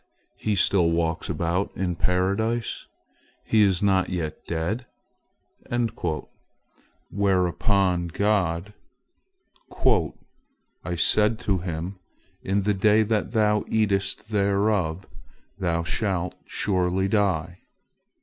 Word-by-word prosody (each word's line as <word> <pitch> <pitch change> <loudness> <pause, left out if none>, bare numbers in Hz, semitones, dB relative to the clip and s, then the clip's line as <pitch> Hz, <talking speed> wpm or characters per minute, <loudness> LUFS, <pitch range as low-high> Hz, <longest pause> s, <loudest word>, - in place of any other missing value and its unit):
He 105 -1 0
still 90 -2 +4
walks 85 -1 -1
about 85 +4 -1
in 90 -2 -1
Paradise? 100 +7 -1 0.6
He 110 - +3
is 95 -2 +3
not 95 -2 +2
yet 85 -4 -4
dead?" 95 +10 -2 2.2
Whereupon 95 -1 +1
God: 95 0 0 1.1
"I 270 - -2
said 105 +6 +3
to 95 -3 0
him, 85 +2 -5 0.4
'In 100 +1 0
the 105 +1 +2
day 105 +2 +4
that 110 +1 -1
thou 105 -2 +2
eatest 100 -1 0
thereof, 100 -3 +1 0.5
thou 85 -3 0
shalt 90 -1 -1
surely 95 -1 0
die!' 90 -5 0
95 Hz, 90 wpm, -25 LUFS, 85-105 Hz, 2.2 s, still